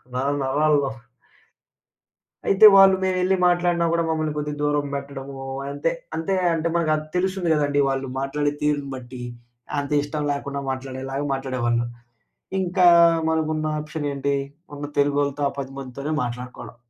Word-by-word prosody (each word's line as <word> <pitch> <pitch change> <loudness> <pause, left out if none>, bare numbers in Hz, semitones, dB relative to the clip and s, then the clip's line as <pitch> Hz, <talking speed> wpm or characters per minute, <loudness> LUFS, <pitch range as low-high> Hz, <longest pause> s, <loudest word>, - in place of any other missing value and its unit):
నర 130 +2 0 0.2
నరాల్లో. 145 0 +2 1.6
అయితే 195 +2 +6
వాళ్ళు 195 -1 +8
మేమేళ్లి 185 0 +2
మాట్లాడినా 175 -1 +2
గూడా 170 0 +1
మమ్మల్ని 155 -1 -1
కొద్దిగా 150 0 -3
దూరం 145 0 +1
బెట్టడము 140 -1 -6 0.3
అంతే. 140 0 -1 0.2
అంతే 165 +4 -1 0.2
అంటే 165 0 -1
మనకది 155 -2 +1
తెలుస్తుంది 185 -1 0
గదండీ! 145 -1 +1
వాళ్ళు 135 0 -2
మాట్లాడే 145 +2 -1
తీరుని 145 -2 0
బట్టి. 125 0 -9 0.6
అంతిష్టం 145 +1 -1
లేకుండా 140 0 -3
మాట్లాడేలాగా 135 +1 -4
మాట్లాడేవాళ్ళు. 125 -3 -1 0.8
ఇంకా 180 0 +3 0.4
మనకున్న 155 -1 0
ఆప్షన్ 150 -1 -4
ఏంటి? 140 0 -1 0.4
ఉన్న 145 0 -5
తెలుగోళ్లతో, 145 0 +1
ఆ - - -11
పదిమందితోనే 135 +2 -5
మాట్లాడుకోవాలా. 125 +1 -7
145 Hz, 120 wpm, -23 LUFS, 135-155 Hz, 1.6 s, వాళ్ళు